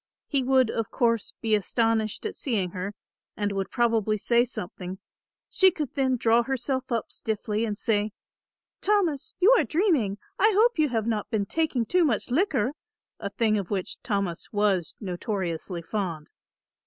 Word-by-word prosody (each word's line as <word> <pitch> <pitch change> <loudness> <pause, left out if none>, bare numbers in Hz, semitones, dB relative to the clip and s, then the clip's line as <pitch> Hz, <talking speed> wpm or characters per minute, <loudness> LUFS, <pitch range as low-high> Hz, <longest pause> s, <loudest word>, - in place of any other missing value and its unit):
He 280 -2 0
would, 260 -2 +3
of 225 - -2
course, 230 -3 0
be 225 -2 0
astonished 220 +1 +1
at - - -3
seeing 200 -9 -1
her 190 +3 -5 0.4
and 205 -1 0
would 195 -1 -2
probably 225 -3 +1
say 235 +3 +3
something; 185 -4 -6 0.5
she 380 - +5
could 305 -7 -4
then 265 -2 +1
draw 230 0 +4
herself 260 +1 -2
up 230 -2 -1
stiffly 215 0 -2
and 210 -2 -3
say; 210 -1 0 0.7
"Thomas, 365 -9 +1
you 400 +7 +7
are - - +3
dreaming, 305 - +1 0.2
I 430 +2 +5
hope 450 -2 +4
you 305 -2 +4
have 225 -3 -1
not 220 -3 -1
been 215 -4 0
taking 295 -2 0
too 360 +8 +3
much 250 -5 0
liquor," 265 - +2 0.5
a 200 - -3
thing 215 0 +1
of 195 - -5
which 195 -3 -3
Thomas 200 -7 -2
was 205 -5 +1
notoriously 180 -3 -3
fond. 170 -5 -4
225 Hz, 160 wpm, -26 LUFS, 200-265 Hz, 0.7 s, you